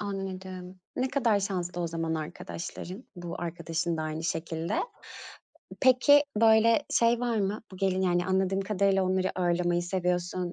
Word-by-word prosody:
anladım. 190 Hz, -2 st, -6 dB, 0.2 s
Ne 255 Hz, +1 st, 0 dB
kadar 235 Hz, -7 st, +2 dB
şanslı 180 Hz, -3 st, -3 dB
o -, -, 0 dB
zaman 165 Hz, 0 st, -2 dB
arkadaşların, 175 Hz, -, -6 dB
bu 175 Hz, -1 st, -6 dB
arkadaşın 170 Hz, 0 st, -2 dB
da 155 Hz, -, -2 dB
aynı 155 Hz, +1 st, -4 dB
şekilde. 165 Hz, 0 st, -2 dB, 1.1 s
Peki, 280 Hz, +3 st, +6 dB, 0.2 s
böyle, 225 Hz, +4 st, +5 dB
şey 235 Hz, 0 st, +3 dB
var 240 Hz, -2 st, 0 dB
mı? 200 Hz, +2 st, -1 dB
Bu 185 Hz, -, -9 dB
gelin 190 Hz, -1 st, +1 dB
yani, 175 Hz, -1 st, +1 dB
anladığım 190 Hz, +1 st, +1 dB
kadarıyla, 195 Hz, -1 st, +2 dB
onları 185 Hz, 0 st, +1 dB
ağırlamayı 175 Hz, -1 st, +1 dB
seviyorsun, 180 Hz, 0 st, -1 dB
185 Hz, 145 wpm, -28 LUFS, 175-200 Hz, 1.1 s, Peki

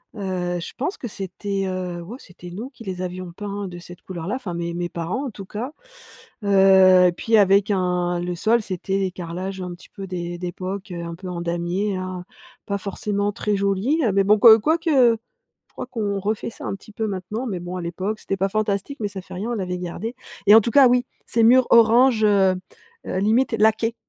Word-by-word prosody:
Heu, 180 Hz, -3 st, -2 dB
je 170 Hz, -, -7 dB
pense 295 Hz, +10 st, -2 dB
que 240 Hz, -, -6 dB
c'était, 195 Hz, 0 st, -4 dB
heu, 180 Hz, -2 st, -4 dB
ouais, 215 Hz, +9 st, -8 dB
c'était 175 Hz, -4 st, -12 dB
nous 220 Hz, +9 st, -6 dB
qui 255 Hz, -4 st, -14 dB
les 185 Hz, -3 st, -5 dB
avions 180 Hz, -1 st, -5 dB
peints 200 Hz, +1 st, -5 dB
de 175 Hz, -1 st, -8 dB
cette 175 Hz, 0 st, -12 dB
couleur-là, 185 Hz, +5 st, -5 dB
enfin 205 Hz, -10 st, -5 dB
mes 170 Hz, 0 st, -3 dB
mes 175 Hz, 0 st, -3 dB
parents 175 Hz, -, -3 dB
en -, -, -3 dB
tout 195 Hz, -1 st, -9 dB
cas. 230 Hz, +8 st, -5 dB, 0.7 s
Heu, 190 Hz, -2 st, +6 dB
et -, -, +2 dB
puis 225 Hz, +5 st, +2 dB
avec 200 Hz, 0 st, +4 dB
un 180 Hz, -2 st, 0 dB
le 175 Hz, 0 st, -3 dB
sol 230 Hz, +6 st, +2 dB
c'était 190 Hz, +1 st, -3 dB
les 190 Hz, -1 st, -1 dB
carrelages 180 Hz, +2 st, -6 dB
un 180 Hz, -1 st, -5 dB
petit 175 Hz, -, -15 dB
peu 195 Hz, -, -8 dB
d'é 175 Hz, -1 st, -4 dB
d'époque, 185 Hz, +2 st, -5 dB
heu, 175 Hz, -, -5 dB
un 170 Hz, 0 st, -6 dB
peu 185 Hz, +2 st, -9 dB
en 175 Hz, -1 st, -4 dB
damier, 175 Hz, +4 st, -1 dB
hein, 185 Hz, -1 st, -5 dB, 0.4 s
pas 200 Hz, 0 st, -1 dB
forcément 200 Hz, +1 st, -2 dB
très 210 Hz, +1 st, -1 dB
jolis. 200 Hz, +11 st, +1 dB
Heu, 220 Hz, -, +2 dB
mais 195 Hz, -, +3 dB
bon, 210 Hz, +2 st, +5 dB
que 220 Hz, 0 st, +9 dB
quoique 325 Hz, +9 st, 0 dB, 0.3 s
je 485 Hz, -, -46 dB
crois -, -, -6 dB
qu'on 210 Hz, -5 st, -2 dB
refait 210 Hz, +3 st, -2 dB
ça -, -, -9 dB
un -, -, -2 dB
petit 205 Hz, +2 st, -15 dB
peu 220 Hz, +1 st, -2 dB
maintenant, 205 Hz, +5 st, -4 dB
mais 190 Hz, -6 st, -3 dB
bon, 180 Hz, +1 st, -5 dB
à -, -, -4 dB
l'époque, 185 Hz, +5 st, -3 dB
c'était 195 Hz, -, -3 dB
pas 195 Hz, +1 st, 0 dB
fantastique, 215 Hz, +5 st, -2 dB
mais 210 Hz, -, 0 dB
ça 195 Hz, -1 st, -7 dB
fait -, -, -12 dB
rien, 210 Hz, +6 st, -3 dB
on -, -, -1 dB
l'avait 180 Hz, -3 st, -3 dB
gardé 190 Hz, +7 st, -5 dB, 0.3 s
et 205 Hz, -, +9 dB
en 225 Hz, -, +8 dB
tout 235 Hz, -, -2 dB
cas, 275 Hz, 0 st, +7 dB
oui, 245 Hz, 0 st, +2 dB, 0.2 s
ces 230 Hz, -, +1 dB
murs 250 Hz, +3 st, +6 dB
orange, 235 Hz, +1 st, +5 dB
heu 195 Hz, -2 st, +4 dB, 0.5 s
heu, -, -, -2 dB
limite 225 Hz, +6 st, +2 dB
laqués 225 Hz, +1 st, +2 dB
195 Hz, 220 wpm, -22 LUFS, 180-220 Hz, 0.7 s, que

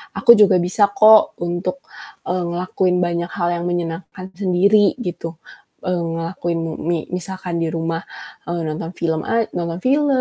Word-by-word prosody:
aku 235 Hz, -5 st, +6 dB
juga 195 Hz, -3 st, +6 dB
bisa 185 Hz, +4 st, +2 dB
kok 215 Hz, 0 st, +6 dB
untuk, 175 Hz, +1 st, -3 dB, 0.4 s
eee, 180 Hz, 0 st, -1 dB
ngelakuin 180 Hz, +1 st, 0 dB
banyak 170 Hz, 0 st, -2 dB
hal 175 Hz, -3 st, 0 dB
yang 170 Hz, -, -4 dB
menyenangkan 175 Hz, +2 st, -4 dB
sendiri," 200 Hz, +2 st, +3 dB
gitu, 165 Hz, -2 st, -5 dB, 0.5 s
eee, 180 Hz, 0 st, 0 dB
ngelakuin 165 Hz, +1 st, -3 dB
mi 165 Hz, -1 st, -4 dB
mi 170 Hz, 0 st, 0 dB, 0.2 s
misalkan 180 Hz, -1 st, -4 dB
di 165 Hz, -, 0 dB
rumah, 165 Hz, 0 st, -2 dB, 0.4 s
eee, 170 Hz, 0 st, -2 dB
nonton 160 Hz, +2 st, -4 dB
film 160 Hz, -2 st, -1 dB
a 230 Hz, 0 st, +2 dB
nonton 170 Hz, -1 st, -3 dB
film, 285 Hz, +3 st, +3 dB
175 Hz, 155 wpm, -20 LUFS, 170-190 Hz, 0.5 s, aku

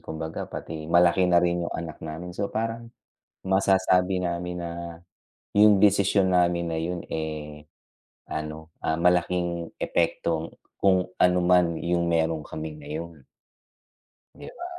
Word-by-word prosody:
kumbaga 80 Hz, 0 st, -6 dB
pati 80 Hz, -1 st, -7 dB
malaki 85 Hz, +2 st, +4 dB
na 90 Hz, -, +4 dB
rin 85 Hz, -1 st, 0 dB
yung -, -, -7 dB
anak 80 Hz, -2 st, -7 dB
namin, 80 Hz, +3 st, -7 dB
so 100 Hz, +2 st, -3 dB
parang 115 Hz, +1 st, -3 dB, 0.6 s
masasabi 95 Hz, -1 st, +2 dB
namin 90 Hz, 0 st, -3 dB
na 85 Hz, -, -4 dB, 0.9 s
yung 105 Hz, -1 st, +6 dB
desisyon 100 Hz, -1 st, +3 dB
namin 85 Hz, -1 st, +2 dB
na 80 Hz, -, -3 dB
yun, 90 Hz, +2 st, -2 dB
eh, 75 Hz, -1 st, -5 dB, 0.7 s
ano, 75 Hz, +1 st, -6 dB
ah, 80 Hz, -, 0 dB
malaking 85 Hz, -1 st, +1 dB
epekto 85 Hz, -1 st, -1 dB, 0.3 s
kung 95 Hz, -2 st, +4 dB
ano 90 Hz, 0 st, +4 dB
man 90 Hz, -2 st, +3 dB
yung 85 Hz, 0 st, 0 dB
meron 80 Hz, -1 st, +1 dB
kaming 80 Hz, -1 st, -7 dB
na 70 Hz, -, -11 dB
yun, 80 Hz, -1 st, -6 dB, 1.1 s
di 145 Hz, +1 st, -11 dB
ba. 350 Hz, -, -8 dB
85 Hz, 135 wpm, -26 LUFS, 80-90 Hz, 1.1 s, yung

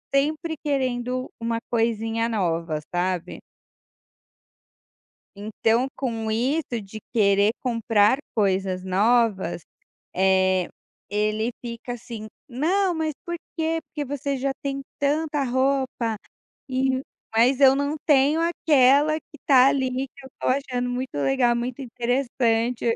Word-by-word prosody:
sempre 310 Hz, +3 st, 0 dB
querendo 255 Hz, -2 st, -1 dB
uma 230 Hz, 0 st, -1 dB
coisinha 225 Hz, 0 st, 0 dB
nova, 165 Hz, -7 st, -1 dB
sabe. 180 Hz, -1 st, -2 dB, 2.0 s
Então 225 Hz, +4 st, 0 dB
com 225 Hz, -4 st, -2 dB
isso 245 Hz, +1 st, 0 dB
de 210 Hz, +2 st, -10 dB
querer 205 Hz, -1 st, +4 dB
comprar 230 Hz, -1 st, +2 dB, 0.2 s
coisas 190 Hz, -2 st, 0 dB
novas, 200 Hz, -3 st, +2 dB, 0.5 s
eh, 185 Hz, -1 st, +3 dB, 0.4 s
ele 215 Hz, +2 st, 0 dB
fica 240 Hz, +1 st, -6 dB
assim: 225 Hz, -2 st, -8 dB, 0.2 s
"Não 350 Hz, +9 st, +1 dB
mas 315 Hz, -2 st, -2 dB
por 345 Hz, 0 st, -3 dB, 0.2 s
quê? 325 Hz, 0 st, 0 dB
Porque 295 Hz, 0 st, -4 dB
você 280 Hz, 0 st, -3 dB
já 270 Hz, +1 st, -1 dB
tem 275 Hz, -1 st, -3 dB, 0.2 s
tanta 295 Hz, 0 st, 0 dB
roupa", 260 Hz, -3 st, 0 dB, 0.5 s
e 260 Hz, 0 st, +1 dB, 0.3 s
mas 250 Hz, +4 st, +4 dB
eu 270 Hz, -1 st, +7 dB
não 285 Hz, +2 st, -1 dB
tenho 290 Hz, +3 st, +4 dB
aquela 300 Hz, -2 st, +4 dB
que 300 Hz, -, -18 dB
está 265 Hz, -2 st, +5 dB
ali 265 Hz, -2 st, +1 dB, 0.2 s
que 275 Hz, +1 st, -17 dB
eu -, -, -11 dB
estou -, -, -3 dB
achando 255 Hz, -2 st, -1 dB
muito 255 Hz, +1 st, -4 dB
legal, 240 Hz, -, +2 dB
muito 245 Hz, +2 st, -3 dB
interessante, 240 Hz, -1 st, 0 dB
eu 230 Hz, -, +4 dB
esses -, -, 0 dB
245 Hz, 125 wpm, -24 LUFS, 220-275 Hz, 2.0 s, eu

